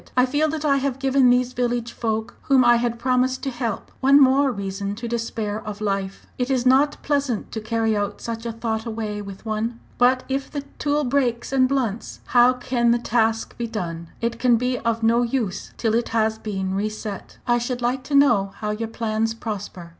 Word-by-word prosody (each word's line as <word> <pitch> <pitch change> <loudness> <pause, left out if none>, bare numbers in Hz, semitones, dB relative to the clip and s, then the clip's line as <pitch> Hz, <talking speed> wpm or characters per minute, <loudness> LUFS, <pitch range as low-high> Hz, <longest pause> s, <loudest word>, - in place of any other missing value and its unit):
I 250 - +6
feel 295 +4 +1
that 310 0 -3
I 280 -2 +4
have 270 -1 -1
given 270 -1 +3
these 250 0 +2
village 240 -1 -1
folk, 220 0 -2 0.2
whom 265 -2 +5
I 240 0 +6
had 235 0 -1
promised 255 +1 +1
to 270 - -1
help, 240 -4 -4
one 275 +2 +6
more 270 0 +5
reason 200 -1 -4
to 235 +3 -5
despair 225 -2 -3
of 210 -1 -6
life. 195 -2 -3
It 250 +1 0
is 260 -2 +1
not 275 +3 +4
pleasant 280 -6 -1
to 220 - -4
carry 225 0 0 0.2
such 230 0 -5
a - - -2
thought 225 0 -3
away 215 -2 -3
with 200 +1 -10
one. 225 +2 -2 0.2
But 255 +1 +4
if 270 +1 -2
the 285 - -4 0.2
tool 295 0 +1
breaks 250 -2 0
and 260 -1 +4
blunts, 240 -6 -2
how 245 +1 +5
can 245 -1 0
the 235 - +4
task 225 -1 0
be 235 - -1
done? 170 -7 -5
It 230 0 -2
can 245 -1 +4
be 250 +1 -1
of 230 -1 -1
no 230 +2 +4
use 235 -5 -2
till 225 -2 0
it 235 +1 +1
has 220 -1 +1
been 190 -3 -3
re 205 +2 0
set. 215 -2 -7
"I 240 0 +3
should 245 +1 -3
like 250 +2 0
to 290 - -1
know 235 -9 +4
how 210 -1 -3
your 225 +2 -3
plans 225 -1 -1
prosper. 205 -6 -6
235 Hz, 205 wpm, -23 LUFS, 220-255 Hz, 0.2 s, I